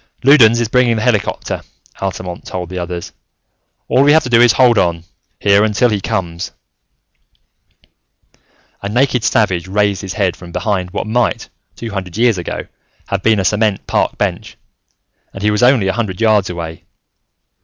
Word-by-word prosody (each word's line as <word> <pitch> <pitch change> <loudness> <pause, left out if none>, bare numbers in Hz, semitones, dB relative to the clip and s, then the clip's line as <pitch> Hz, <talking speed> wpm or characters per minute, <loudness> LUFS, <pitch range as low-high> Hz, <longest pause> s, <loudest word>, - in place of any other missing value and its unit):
"Loudons 120 -4 +6
is 120 - 0
bringing 120 0 +2
the 110 - -2
helicopter," 110 -4 -1 0.4
Altamont 90 -2 -5
told 90 -2 -5
the 90 0 -5
others. 85 0 -5 0.8
"All 130 - +3
we 145 +1 +5
have 160 - +4
to 125 - -5
do 115 0 +5
is 120 - +6
to - - +2
hold 125 -4 +5
on, 85 -1 0 0.4
here, 100 0 +4
until 110 +3 +2
he 105 -3 -1
comes." 85 -2 -3 2.3
A 100 - -4
naked 125 +1 +1
savage 95 -5 +1
raised 100 0 0
his 95 -2 -6
head 100 -4 0
from 90 -2 -12
behind 95 -2 -2
what 95 - -4
might, 120 +2 -1 0.3
two 115 -1 -7
hundred 95 -2 -5
years 115 -4 +2
ago, 85 - -5 0.4
have 100 -1 -1
been 110 +1 +2
a 95 - -1
cement 105 0 0
park - - -1
bench - - -3 0.8
and 95 - -7
he 105 - +3
was 105 - 0
only 125 -5 +4
a 95 - +1
hundred 105 -3 -3
yards 110 -4 +2
away. 85 -2 -6
105 Hz, 170 wpm, -16 LUFS, 95-115 Hz, 2.3 s, Loudons